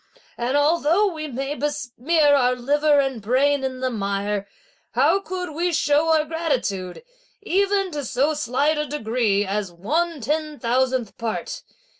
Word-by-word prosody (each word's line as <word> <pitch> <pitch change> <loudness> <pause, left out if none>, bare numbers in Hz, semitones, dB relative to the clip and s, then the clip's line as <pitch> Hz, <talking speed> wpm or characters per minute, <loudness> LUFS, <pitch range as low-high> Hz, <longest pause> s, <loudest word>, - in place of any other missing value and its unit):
And 250 +4 0
although 335 +6 +3
we 310 -1 -5
may 270 +1 -3
besmear 295 +1 +1
our 250 -3 +3
liver 290 +4 +2
and 265 -4 -1
brain 270 +6 +2
in 260 -1 -3
the 255 0 0
mire, 200 -1 -2 0.5
how 390 - +3
could 370 -3 -5
we 345 +4 -1
show 300 0 +2
our 315 -1 +3
gratitude, 265 - -2 0.4
even 395 -1 +1
to 295 -2 -4
so 275 +5 +1
slight 295 +1 0
a 300 - -1
degree 220 -7 0
as 200 -1 -2
one 310 - -1
ten 300 +4 -2
thousandth 255 -2 0
part. 230 -1 -4
285 Hz, 145 wpm, -23 LUFS, 240-310 Hz, 0.5 s, although